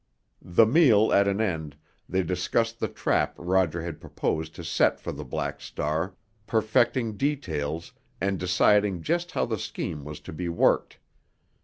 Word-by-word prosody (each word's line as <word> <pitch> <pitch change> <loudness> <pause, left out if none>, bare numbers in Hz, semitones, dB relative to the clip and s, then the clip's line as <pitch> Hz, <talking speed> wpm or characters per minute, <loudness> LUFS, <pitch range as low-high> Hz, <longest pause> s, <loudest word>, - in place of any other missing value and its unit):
The 90 +6 +4
meal 110 -5 +5
at 100 0 +5
an 100 +1 0
end, 80 -9 -2 0.3
they 95 0 +1
discussed 115 +6 -1
the - - 0
trap - - 0
Roger 90 -2 +1
had 85 -3 -6
proposed 80 0 -3
to 85 - -8
set 85 +2 +2
for - - -5
the 75 +1 -7
Black 65 - -4
Star, 80 +5 -2 0.3
perfecting 110 0 +1
details 85 - -2 0.3
and 100 -1 -1
deciding 95 0 +3
just 175 +1 -1
how - - +1
the 110 -3 -3
scheme 80 -6 -4
was 75 +1 -7
to - - -9
be 85 +2 -3
worked. 85 - +2
90 Hz, 155 wpm, -26 LUFS, 80-110 Hz, 0.3 s, meal